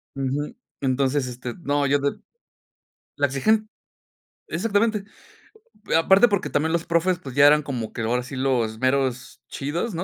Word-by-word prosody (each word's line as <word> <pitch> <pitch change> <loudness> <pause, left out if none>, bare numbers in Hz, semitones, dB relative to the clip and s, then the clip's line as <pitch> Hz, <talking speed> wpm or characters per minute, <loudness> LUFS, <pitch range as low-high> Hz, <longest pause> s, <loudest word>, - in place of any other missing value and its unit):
Ujú, 135 +2 -3 0.3
entonces, 135 0 +1
este, 125 -1 -6
no, 145 -1 0
yo 140 +1 +2
de 140 0 0 1.0
la 140 0 +2
exigen 215 +11 +1 0.8
exactamente. 210 +2 0 0.9
Eh, - - +2
aparte 190 +7 +6
porque 200 -3 -1
también 160 +3 0
los 170 -1 0
profes, 170 +1 +1
pues 135 -8 -9
ya 145 0 +7
eran 150 +1 +5
como 125 -6 -5
que 115 - -4
ahora 120 +2 0
sí 130 - -8
los 120 -4 0
meros 130 -1 -1
chidos, 165 +10 -3
¿no?, 170 - -2
140 Hz, 155 wpm, -23 LUFS, 130-170 Hz, 1.0 s, ya